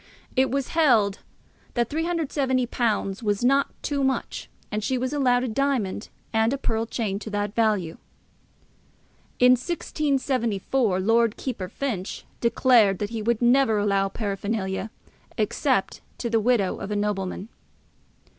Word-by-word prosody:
it 260 0 +3
was 275 0 -1
held 225 -12 +3 0.6
that 240 -2 +1
£370 260 - -1
was 205 +1 0
not 275 +2 +4 0.2
too 280 -2 -1
much, 265 0 -2 0.2
and 210 0 -2
she 260 +4 0
was 255 +2 -2
allowed 250 -4 +2
a - - -1
diamond 235 -5 -1 0.2
and 220 +1 +3
a 275 - 0
pearl 225 -3 -1
chain 210 -4 -2
to 215 - -7
that 205 0 -2
value. 210 -8 0 1.4
In 250 0 +6
1674, 255 - 0
Lord 225 +3 +2
Keeper 210 -9 -4
Finch 215 -5 -4
declared 235 -4 +4
that 205 +3 -4
he 225 -2 -3
would 235 +2 0
never 240 -2 +4
allow 200 -1 +1
paraphernalia, 200 0 -3 0.5
except - - 0 0.2
to 235 - -3
the 225 - +3
widow 220 -4 +1
of 195 - -5
a 210 - -2
nobleman. 205 -1 -2
230 Hz, 135 wpm, -25 LUFS, 205-260 Hz, 1.4 s, In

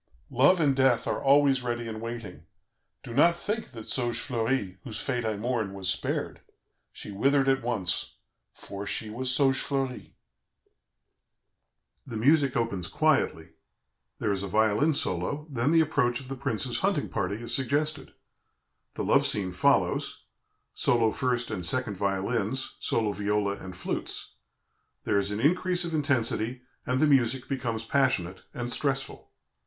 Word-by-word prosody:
Love 140 +9 +5
and 145 -4 +3
death 130 -3 +3
are - - -1
always 140 -1 +4
ready 120 -1 -3
and 110 -1 -6
waiting. 115 -9 -7 0.6
Do 115 - -8
not 170 +6 +4
think 215 +5 -3
that 115 -4 -9
Saugefleurie, 120 -5 -1
whose 115 -4 -5
fate 125 -3 -1
I 110 -2 -1
mourn, 110 -3 -2
was 95 -2 0
spared. - - -1 0.5
She - - -9
withered 135 +7 +2
at 135 0 +3
once, 110 -7 -1 0.4
for 100 0 -8
she 110 -1 -3
was 125 +3 -2
Saugefleurie." 135 -1 0 1.9
The 115 -4 -5
music 140 +2 +3
opens 100 -7 -1
quietly; - - +1 0.7
there - - -1
is 95 -1 -1
a 100 - -3
violin 110 - +2
solo; 140 - -1
then 125 +2 +1
the 165 -1 +6
approach 140 -6 +1
of 130 -1 -10
the 135 - -4
prince's 115 -5 -1
hunting - - 0
party 100 - -2
is 115 +2 -5
suggested. 140 +2 -1 0.8
The - - -3
love - - +4
scene 95 -3 -2
follows 90 - +1 0.5
solo 115 -2 +2
first 125 -2 -1
and 95 -4 -3
second 110 +3 0
violins, 100 +5 -1
solo 110 -2 0
viola, 105 0 0
and 95 -1 -9
flutes; - - -4 0.7
there 100 - +2
is 100 0 -1
an 105 0 -3
increase 175 +5 +2
of 170 - -4
intensity, 125 -4 0 0.2
and 125 +1 +1
the 155 - +5
music 130 -3 +2
becomes 120 -5 -2
passionate 105 -9 +1
and 120 0 -4
stressful. 135 -1 -2
120 Hz, 145 wpm, -28 LUFS, 105-135 Hz, 1.9 s, the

